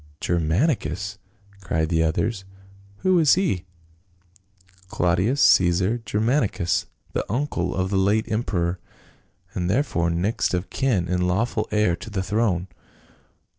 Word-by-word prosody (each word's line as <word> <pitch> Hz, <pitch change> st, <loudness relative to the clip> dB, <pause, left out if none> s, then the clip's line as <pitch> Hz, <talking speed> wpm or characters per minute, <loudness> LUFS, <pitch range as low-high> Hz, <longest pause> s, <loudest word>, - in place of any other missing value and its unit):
" -, -, -43 dB
Germanicus 90 Hz, -, 0 dB, 0.2 s
!" 100 Hz, 0 st, -26 dB
cried 80 Hz, -4 st, -1 dB
the 80 Hz, -2 st, +2 dB
others. 95 Hz, +6 st, 0 dB, 0.6 s
"Who 185 Hz, -2 st, +4 dB
is 155 Hz, -4 st, +5 dB
he 160 Hz, -, 0 dB, 0.3 s
?" 90 Hz, +1 st, -34 dB
" 95 Hz, -1 st, -30 dB
Claudius 90 Hz, +11 st, +1 dB
Caesar 90 Hz, +6 st, +4 dB
Germanicus, 110 Hz, -, 0 dB, 0.3 s
the -, -, 0 dB
uncle 115 Hz, -9 st, -1 dB
of 95 Hz, 0 st, -1 dB
the 100 Hz, -, +1 dB
late 105 Hz, +3 st, +2 dB
emperor, 90 Hz, -6 st, -1 dB, 0.7 s
and 90 Hz, -1 st, -2 dB
therefore 95 Hz, -, +1 dB
next 90 Hz, +4 st, 0 dB
of 90 Hz, +2 st, -4 dB
kin 115 Hz, -11 st, 0 dB
and 90 Hz, 0 st, 0 dB
lawful 110 Hz, +4 st, 0 dB
heir 105 Hz, -5 st, +2 dB
to 95 Hz, -, -9 dB
the 100 Hz, -3 st, -2 dB
throne." 95 Hz, -3 st, 0 dB
95 Hz, 135 wpm, -23 LUFS, 90-110 Hz, 0.7 s, is